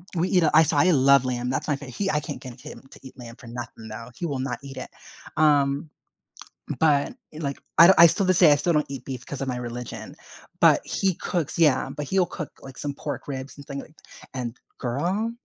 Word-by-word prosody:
we 175 Hz, +2 st, +1 dB
eat, 180 Hz, -2 st, +3 dB
uh, 155 Hz, -, +3 dB
I 160 Hz, +1 st, +8 dB
so, 155 Hz, -1 st, 0 dB
I 180 Hz, +6 st, +5 dB
love 140 Hz, -2 st, +5 dB
lamb. 125 Hz, -1 st, -2 dB
That's 130 Hz, -, -2 dB
my 150 Hz, -, +1 dB
fa 140 Hz, +1 st, -9 dB
he, 190 Hz, +10 st, -3 dB
I 150 Hz, -, +1 dB
can't 150 Hz, -, -7 dB
get 125 Hz, -3 st, -10 dB
him -, -, -10 dB
to -, -, -14 dB
eat 130 Hz, 0 st, -13 dB
lamb 120 Hz, -2 st, -10 dB
for 120 Hz, -, -14 dB
nothing 115 Hz, -1 st, -8 dB
though. 115 Hz, +2 st, -8 dB
He 175 Hz, -, -4 dB
will 140 Hz, -5 st, -2 dB
not 130 Hz, -2 st, -3 dB
eat 135 Hz, -1 st, -9 dB
it, -, -, -6 dB, 0.5 s
um, 145 Hz, -1 st, +3 dB, 0.9 s
but, 145 Hz, -3 st, +3 dB, 0.2 s
like, 145 Hz, -3 st, -4 dB, 0.2 s
I 170 Hz, -, +10 dB
d 190 Hz, -, +8 dB
I 170 Hz, -, +10 dB
still 195 Hz, +4 st, 0 dB
this 185 Hz, -1 st, +3 dB
day 170 Hz, -5 st, +8 dB
I -, -, +6 dB
still 155 Hz, +4 st, 0 dB
don't 150 Hz, -1 st, +2 dB
eat 135 Hz, -3 st, -7 dB
beef 130 Hz, -2 st, -6 dB
'cause 140 Hz, -, -6 dB
of 135 Hz, -, -2 dB
my 125 Hz, -1 st, -2 dB
religion, 120 Hz, 0 st, -7 dB, 0.4 s
but -, -, +6 dB
he 190 Hz, -3 st, 0 dB
cooks 170 Hz, -2 st, -3 dB
Yeah, 145 Hz, -6 st, +3 dB
but 145 Hz, +2 st, -5 dB
he'll 190 Hz, +2 st, +2 dB
cook, 155 Hz, -2 st, -6 dB
like, 135 Hz, -1 st, -11 dB
some 145 Hz, -1 st, -4 dB
pork 140 Hz, -2 st, -6 dB
ribs, 135 Hz, -1 st, -6 dB
and 140 Hz, -, -11 dB
things, 140 Hz, 0 st, -5 dB
like, 155 Hz, -, -18 dB, 0.4 s
and 125 Hz, -2 st, -4 dB, 0.2 s
girl 175 Hz, -, -1 dB
140 Hz, 235 wpm, -25 LUFS, 130-160 Hz, 0.9 s, I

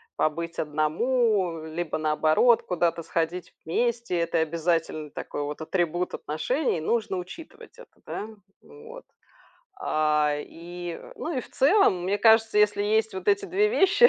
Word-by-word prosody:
побыть 165 Hz, +2 st, -1 dB
одному, 170 Hz, -, 0 dB
либо, 160 Hz, +1 st, -3 dB
наоборот, 155 Hz, +9 st, +3 dB
куда-то 170 Hz, -2 st, 0 dB
сходить 170 Hz, +2 st, -2 dB
вместе, 235 Hz, +2 st, 0 dB
это 170 Hz, -1 st, 0 dB
обязательный 160 Hz, -1 st, -1 dB
такой 145 Hz, -, -5 dB
вот 150 Hz, +2 st, -5 dB
атрибут 175 Hz, +1 st, -1 dB
отношений, 165 Hz, -, -1 dB
нужно 210 Hz, +2 st, 0 dB
учитывать 215 Hz, -, -10 dB
это, -, -, -14 dB
да. 210 Hz, -, -5 dB, 0.3 s
Вот, 460 Hz, +3 st, -13 dB, 0.8 s
а, 150 Hz, -, +1 dB
и, 175 Hz, +3 st, -8 dB, 0.2 s
ну, 325 Hz, -2 st, -4 dB
и -, -, 0 dB
в -, -, -14 dB
целом, 270 Hz, -, +3 dB
мне 200 Hz, +3 st, 0 dB
кажется, 225 Hz, -1 st, +5 dB
если 210 Hz, -1 st, +3 dB
есть 220 Hz, +1 st, +1 dB
вот 190 Hz, 0 st, -4 dB
эти 200 Hz, 0 st, +2 dB
2 410 Hz, +3 st, +2 dB
вещи, 425 Hz, +1 st, +5 dB
180 Hz, 135 wpm, -26 LUFS, 160-235 Hz, 0.8 s, кажется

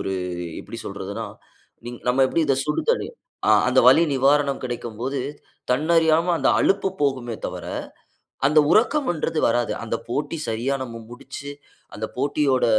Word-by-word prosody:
1 95 Hz, -, -2 dB, 0.5 s
எப்டி -, -, -9 dB
சொல்றது? -, -, -6 dB, 1.0 s
நம்ம 125 Hz, +2 st, +2 dB
எப்டி 165 Hz, -, +1 dB
இத 135 Hz, -, +2 dB
சுடுதண்ணீர்? 465 Hz, -, -1 dB, 0.5 s
அந்த -, -, +2 dB
வலி 165 Hz, -, +7 dB
நிவாரணம் 140 Hz, +1 st, +2 dB
கெடைக்கும் 120 Hz, -3 st, -5 dB
போது 135 Hz, +1 st, -2 dB, 0.5 s
தன்னறியாம 160 Hz, +4 st, +3 dB
அந்த 135 Hz, -, +2 dB
அழுப்பு 195 Hz, 0 st, +2 dB
போகுமே 130 Hz, -4 st, 0 dB
தவிர -, -, -6 dB, 0.8 s
அந்த 155 Hz, +1 st, +5 dB
உறக்கன்றது 220 Hz, -, +2 dB
வராது. 120 Hz, 0 st, 0 dB
அந்த 115 Hz, -, -2 dB
போட்டி 145 Hz, +5 st, -2 dB
சரியா 115 Hz, +5 st, -1 dB
நம்ம 115 Hz, -2 st, -8 dB
முடிச்சு, 140 Hz, +3 st, -9 dB, 0.5 s
அந்த 110 Hz, +1 st, -3 dB
போட்டியோட 140 Hz, -1 st, +1 dB
140 Hz, 125 wpm, -23 LUFS, 125-160 Hz, 1.0 s, வலி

